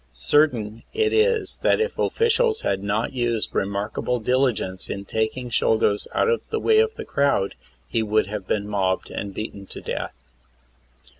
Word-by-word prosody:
Certain 115 - +2
it 440 -1 +2
is 440 -2 +2
that - - +3
if 455 +2 0
the - - 0
offipials 460 0 +2
had 95 - 0
not 105 +5 -1
used 120 -3 -1
remarkable 100 +5 -1
diligence 115 -6 0
in 100 0 -4
tak 110 +4 -1
ing 125 -1 -6
Czolgosz 105 -2 +2
out - - +2
of 465 0 +2
the 445 - -1
way 440 0 +4
of 445 0 +2
the - - -6
crowd 140 -8 +1 0.3
he 115 - 0
would 110 0 +2
have 105 -2 -6
been 105 -1 -1
mobbed 95 -2 -1
and 100 - -4
beaten 100 -1 -6
to - - -8
death. - - -4
115 Hz, 170 wpm, -23 LUFS, -, 0.3 s, way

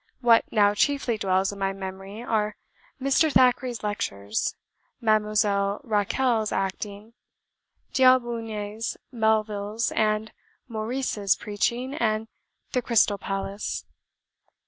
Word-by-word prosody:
What 235 -2 +4
now 205 -2 +4
chiefly 245 0 +1
dwells 190 0 +1
in 200 - -9
my 195 0 0
memory 195 +3 -7
are 215 -3 0 0.4
Mr. 275 +4 +3
Thackeray's 250 -3 +3
lectures, 105 - -2 0.4
Mademoiselle 210 -2 +2
Rachel's 220 0 +1
acting, 200 +3 -4 0.8
D'Aubigne's, 230 -4 +1
Melville's, 220 -1 0
and 215 0 0 0.4
Maurice's 220 -3 0
preaching, 235 +5 -2
and 220 -5 0 0.4
the 250 - +1
Crystal 220 -4 +3
Palace. 195 +1 -4
215 Hz, 95 wpm, -26 LUFS, 200-235 Hz, 0.8 s, What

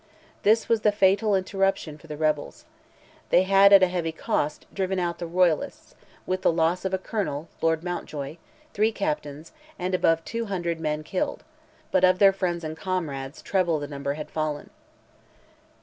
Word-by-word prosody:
This 220 +2 +3
was 230 -2 +2
the 210 - +4
fatal 200 +1 +3
interruption 195 -5 -1
for 165 - -16
the 150 -1 -6
rebels. 155 - -1 0.6
They 180 - +5
had, 195 +1 +6
at 195 -2 +8
a - - +6
heavy 175 -2 -2
cost, 150 -1 -2
driven 190 -1 -1
out 175 -1 -2
the 170 - -4
royalists, 175 -2 0 0.3
with 185 0 -2
the - - +3
loss 165 +3 0
of 190 - -1
a - - -1
colonel 180 -6 -4
(Lord 165 0 +1
Mountjoy), 155 -4 -5 0.4
three 215 +2 +2
captains, 150 -6 -4 0.3
and 185 +1 -3
above 165 -2 +2
200 190 -8 -3
men 155 -1 -2
killed: 185 +4 -3 0.5
but - - +2
of 185 0 +5
their 195 0 +6
friends 175 -3 -2
and 155 0 -4
comrades 160 -6 -4
treble 180 -5 +1
the 145 -1 -5
number 140 -1 -3
had 150 0 -7
fallen. 155 -2 -3
175 Hz, 165 wpm, -25 LUFS, 155-190 Hz, 0.6 s, at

